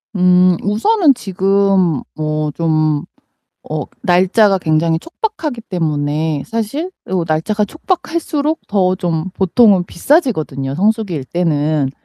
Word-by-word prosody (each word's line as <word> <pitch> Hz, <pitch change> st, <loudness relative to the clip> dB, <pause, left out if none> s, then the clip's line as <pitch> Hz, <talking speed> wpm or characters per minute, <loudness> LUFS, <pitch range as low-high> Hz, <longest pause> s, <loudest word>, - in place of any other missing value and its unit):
음, 180 Hz, -1 st, +4 dB
우선은 280 Hz, -, +3 dB
지금 195 Hz, -, +1 dB
뭐 155 Hz, -1 st, -2 dB
좀 155 Hz, -1 st, 0 dB, 0.6 s
어 -, -, -2 dB, 0.2 s
날짜가 190 Hz, +2 st, +3 dB
굉장히 160 Hz, -1 st, +1 dB
촉박하기 330 Hz, -, -4 dB
때문에 155 Hz, -4 st, -1 dB
이거 -, -, -7 dB
사실 230 Hz, -, -3 dB, 0.4 s
날짜가 185 Hz, +7 st, 0 dB
촉박할수록 315 Hz, -, -2 dB
더 185 Hz, -3 st, +2 dB
좀 175 Hz, -2 st, -2 dB
보통은 190 Hz, +1 st, +3 dB
비싸지거든요 160 Hz, -, 0 dB
성수기일때는. 160 Hz, -, 0 dB
185 Hz, 255 characters per minute, -16 LUFS, 155-220 Hz, 0.6 s, 음